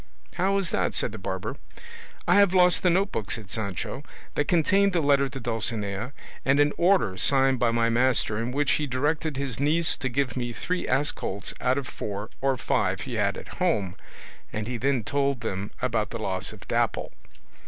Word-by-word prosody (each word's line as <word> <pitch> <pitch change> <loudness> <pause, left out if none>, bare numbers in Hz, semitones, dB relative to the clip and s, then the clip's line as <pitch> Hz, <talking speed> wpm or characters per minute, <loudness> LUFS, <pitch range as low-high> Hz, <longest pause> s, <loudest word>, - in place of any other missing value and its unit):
"How 195 +2 +1
is 190 -3 0
that?" - - 0
said - - 0
the - - -8
barber. - - -4 0.7
"I - - +5
have 200 -2 +4
lost 180 -1 +5
the 180 - +3
note 195 +3 +2
book," 100 - -3
said 110 -5 -5
Sancho, 110 +4 -4 0.3
"that 145 - 0
contained 195 +4 +3
the 175 - +2
letter 140 -2 +3
to 135 - -7
Dulcinea, 115 -2 0 0.3
and 135 +2 +3
an 145 0 +4
order 170 - +2
signed 135 +1 +3
by 120 - +3
my 115 0 +2
master 115 -2 +2
in 115 +2 -2
which 140 +1 +1
he 150 0 +1
directed 145 +3 -1
his 135 -4 -3
niece 160 +4 +3
to 130 - -2
give 130 +1 -1
me 120 -2 -3
three 180 +9 -3
ass 135 +3 +2
colts 100 +1 -5
out 130 +1 +2
of 140 -3 -3
four 105 -1 -5
or 135 -1 +1
five - - 0
he - - -6
had - - 0
at - - -10
home;" 95 -3 +1 0.6
and 105 0 -3
he 120 +1 -3
then 130 -1 +1
told 140 +1 0
them 100 -2 -3
about 115 -4 0
the 115 - -5
loss 95 -4 -2
of - - -13
Dapple. - - 0
130 Hz, 195 wpm, -26 LUFS, 115-145 Hz, 0.7 s, I